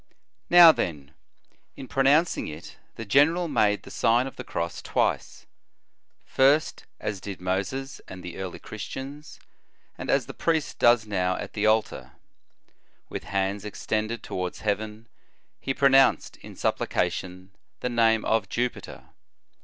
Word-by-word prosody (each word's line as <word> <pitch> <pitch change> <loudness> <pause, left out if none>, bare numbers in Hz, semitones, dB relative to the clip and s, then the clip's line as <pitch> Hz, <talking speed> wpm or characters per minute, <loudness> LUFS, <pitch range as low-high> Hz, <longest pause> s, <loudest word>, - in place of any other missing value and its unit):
Now 175 -2 +10
then, 75 - -4 0.6
in 130 - -9
pronouncing 140 +7 +2
it, 75 +1 -9 0.2
the 115 - -7
general 155 - +3
made 105 -8 +1
the - - -12
Sign 120 +4 +2
of 135 - -8
the 125 - -7
Cross 85 -6 -4
twice; - - -2 0.8
first 140 +4 +2
as 100 -3 -4
did 100 -2 -7
Moses 100 +10 -3
and 90 -1 -10
the 90 -1 -8
early 95 -2 -5
Christians, 135 +7 -8 0.6
and - - -6
as - - +2
the - - -9
priest 160 -3 -1
does 120 -2 +4
now 95 -3 -1
at - - -7
the 105 0 0
altar. 110 0 0 1.0
With - - -6
hands 100 +1 -2
extended 110 +2 -3
towards 90 -1 -5
heaven, 105 +2 -3 0.5
he 135 - -3
pronounced 135 0 +3
in - - -12
supplication 90 +1 -2 0.3
the 125 - -1
name 115 -2 +2
of 110 -3 0
Jupiter. 125 +1 -4
110 Hz, 135 wpm, -26 LUFS, 95-135 Hz, 1.0 s, Now